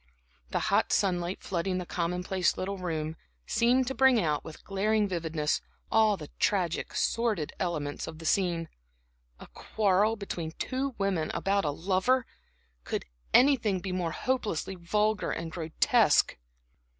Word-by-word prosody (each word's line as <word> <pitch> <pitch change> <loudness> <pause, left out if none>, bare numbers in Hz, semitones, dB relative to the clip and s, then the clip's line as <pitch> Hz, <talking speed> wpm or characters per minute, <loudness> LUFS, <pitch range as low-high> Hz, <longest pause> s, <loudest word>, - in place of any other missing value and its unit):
The - - 0
hot - - +3
sunlight, 180 -2 0
flooding 185 +1 -1
the 180 - -3
commonplace 180 +2 -1
little 195 +1 -3
room, 160 -3 -3 0.3
seemed 250 +2 +3
to 265 - -2
bring 265 -3 +5
out, 150 -6 0
with 160 - -11
glaring 210 +2 +1
vividness, 160 -4 -1 0.3
all 215 -2 +4
the 150 -4 -9
tragic, 180 -5 0
sordid 220 -10 0
elements 150 -5 -2
of 160 - -7
the 165 - -10
scene. 170 -2 +1 0.7
A - - -10
quarrel 210 +1 +1
between 175 -6 -5
two 265 +4 -3
women 190 -6 0
about 200 -2 +1
a - - +1
lover! 190 - +1 0.6
Could - - -3 0.3
anything 240 -8 +4
be 190 +1 -5
more 180 -2 -1
hopelessly 215 -3 -2
vulgar 210 +4 0
and 165 -1 -4
grotesque? 160 -1 +3
185 Hz, 140 wpm, -29 LUFS, 165-215 Hz, 0.7 s, bring